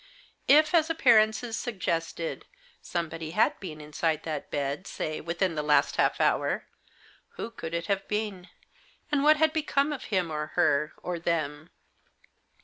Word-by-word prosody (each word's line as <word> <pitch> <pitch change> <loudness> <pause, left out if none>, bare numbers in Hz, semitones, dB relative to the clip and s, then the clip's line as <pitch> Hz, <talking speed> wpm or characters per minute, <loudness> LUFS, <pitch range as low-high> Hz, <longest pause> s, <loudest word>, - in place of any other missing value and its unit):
If, 310 +3 +6
as 325 -1 +4
appearances 230 -6 +3
suggested, 170 -7 -3 0.3
somebody 165 -2 -4
had - - +3
been 160 -6 -7
inside 155 +1 -1
that 155 -3 -4
bed, 140 +4 -3
say, 155 0 -4
within 170 +2 -1
the 150 - -1
last 150 0 +2
half - - +2
hour, - - +1 0.7
who 230 - -5
could 165 -7 -6
it 170 0 -2
have 195 0 -1
been? 210 -3 -3 0.6
and 290 -2 +2
what 305 +1 +6
had 315 0 +3
become 295 -2 +1
of 280 - -7
him 185 -6 0
or 150 0 -4
her, 150 -3 +2
or 180 -1 -3
them? 155 -2 -2
175 Hz, 145 wpm, -28 LUFS, 155-230 Hz, 0.7 s, If